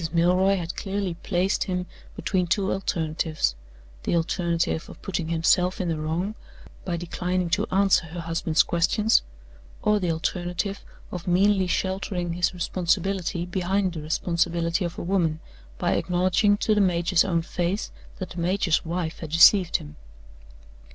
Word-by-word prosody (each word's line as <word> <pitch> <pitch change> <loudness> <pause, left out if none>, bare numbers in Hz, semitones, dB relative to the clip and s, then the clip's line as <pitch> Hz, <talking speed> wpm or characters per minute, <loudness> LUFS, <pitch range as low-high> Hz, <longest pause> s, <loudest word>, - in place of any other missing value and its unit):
Milroy 180 +3 +3
had 170 -1 -4
clearly 195 -2 -2
placed 180 +3 0
him 180 -2 -2 0.3
between 185 -3 0
two 190 +2 +1
alternatives 160 - -1 0.5
the - - 0
alternative 170 -1 0
of - - -11
putting 180 -4 -2
himself 170 +3 +2
in 180 - -1
the 160 -2 -1
wrong, 165 +7 -2 0.5
by 175 -2 -2
declining 180 +1 -2
to 205 +4 +1
answer 195 -3 +3
her 170 +2 -6
husband's 165 -1 +1
questions; 195 +6 +2 0.6
or 210 0 +3
the 180 -3 -1
alternative 175 +4 -2 0.3
of 180 -1 -6
meanly 190 +1 +3
sheltering 185 -1 -2
his 175 +1 +1
responsibility 180 0 -1
behind 185 +1 0
the 160 - -5
responsibility 170 +2 0
of 170 -1 -4
a - - -4
woman, 170 -4 0 0.4
by - - 0
acknowledging 185 +3 +2
to 215 - +1
the 210 - +3
major's 175 -1 +3
own 170 -4 0
face 175 +4 -2 0.3
that 185 - -6
the 175 - -7
major's 175 -1 +1
wife 170 -1 -3
had 160 - -6
deceived 170 +3 +6
him. 75 +1 -12
180 Hz, 145 wpm, -25 LUFS, 170-190 Hz, 0.6 s, deceived